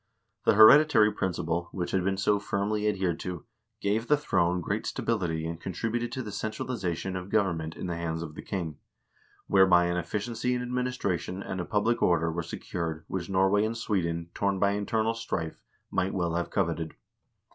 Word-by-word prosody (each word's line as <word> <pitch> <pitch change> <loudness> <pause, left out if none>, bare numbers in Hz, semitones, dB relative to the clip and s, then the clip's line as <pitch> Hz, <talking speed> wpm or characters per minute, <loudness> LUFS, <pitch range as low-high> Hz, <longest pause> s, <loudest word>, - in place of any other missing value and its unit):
The - - +5
hereditary 110 0 +8
principle, 85 -3 -2
which 90 -2 -3
had 95 -1 +1
been 95 +1 0
so 100 +1 +2
firmly 105 +1 -1
adhered 95 -5 0
to, 90 -4 -5 0.4
gave 110 +4 0
the 150 - +4
throne 90 -10 +1
great 85 - -2
stability 85 -8 -1
and 85 +1 -5
contributed 115 +6 -2
to 130 - -3
the 105 - -6
centralization 100 -4 -3
of 90 +1 -5
government 85 -7 0
in - - -6
the 85 -2 -2
hands 85 -1 -3
of 75 -2 -7
the - - -8
king, 85 -7 -4 0.7
whereby 95 -3 +5
an 85 0 0
efficiency 105 +8 -2
in 125 - -2
administration 125 -7 -2
and 95 -1 -4
a - - -4
public 110 +5 +1
order 85 -1 +3
were 85 +2 -2
secured 80 -1 -5
which 90 -2 -3
Denmark 95 +1 +3
and 110 +1 -1
Sweden, 85 -6 -1
torn 100 -1 0
by 100 +1 +3
internal 110 +2 0
strife, 80 -8 -4 0.3
might 95 +2 0
well 85 -3 0
have 85 -1 -1
coveted. 80 -1 -1
95 Hz, 175 wpm, -28 LUFS, 85-105 Hz, 0.7 s, hereditary